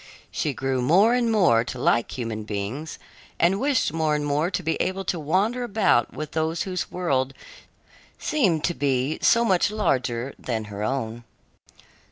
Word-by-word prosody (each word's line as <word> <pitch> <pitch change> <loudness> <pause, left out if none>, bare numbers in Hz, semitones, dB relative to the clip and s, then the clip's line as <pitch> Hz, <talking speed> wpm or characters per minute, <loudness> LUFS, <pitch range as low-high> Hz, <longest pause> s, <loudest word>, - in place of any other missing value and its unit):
She 150 - -1
grew 135 -1 -1
more 190 - +4
and 240 -2 +1
more 175 - +4
to 130 - -6
like 120 0 +1
human 115 -3 -3
beings 110 +9 -5 0.4
and 180 +4 +3
wished 270 - +1
more 160 -2 +1
and 150 0 -2
more 145 +4 +1
to 185 -1 -3
be 165 +1 0
able 190 +1 -2
to 175 - -1
wander 200 +11 0
about 205 - +2
with 150 +4 -6
those 160 +1 -1
whose 185 -2 -3
world 135 -7 -1 0.8
seemed 190 - +1
to 175 - +1
be 140 0 0
so 235 0 +4
much 190 -2 +3
larger 130 - -1
than 115 -3 -3
her 100 - -5
own. 120 -1 -3
155 Hz, 165 wpm, -24 LUFS, 130-190 Hz, 0.8 s, more